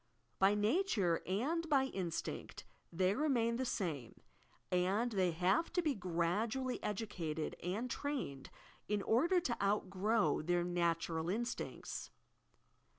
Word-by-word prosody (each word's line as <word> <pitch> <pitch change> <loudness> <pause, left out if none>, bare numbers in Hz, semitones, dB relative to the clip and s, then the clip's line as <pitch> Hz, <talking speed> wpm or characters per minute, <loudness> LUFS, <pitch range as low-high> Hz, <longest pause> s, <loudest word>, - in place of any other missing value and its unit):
By 195 +2 +5
nature 210 - +2
and 305 - 0
by 275 -3 +5
instinct 190 -10 -4 0.3
they 185 +3 +2
remain 235 -4 +1
the 260 - -1
same, 155 - -3 0.5
and 190 +7 +2
they 190 -4 +2
have 180 - +2
to 355 - +3
be 305 -3 +2
gradually 210 +7 -1
educated 175 -7 -3
and 200 +8 -2
trained 250 - -3 0.4
in 205 -1 0
order 335 +11 +3
to 240 -9 -1
outgrow 200 -2 +2
their 175 +2 +1
natural 170 -1 0
instincts. 235 +5 -3
200 Hz, 115 wpm, -36 LUFS, 175-245 Hz, 0.5 s, By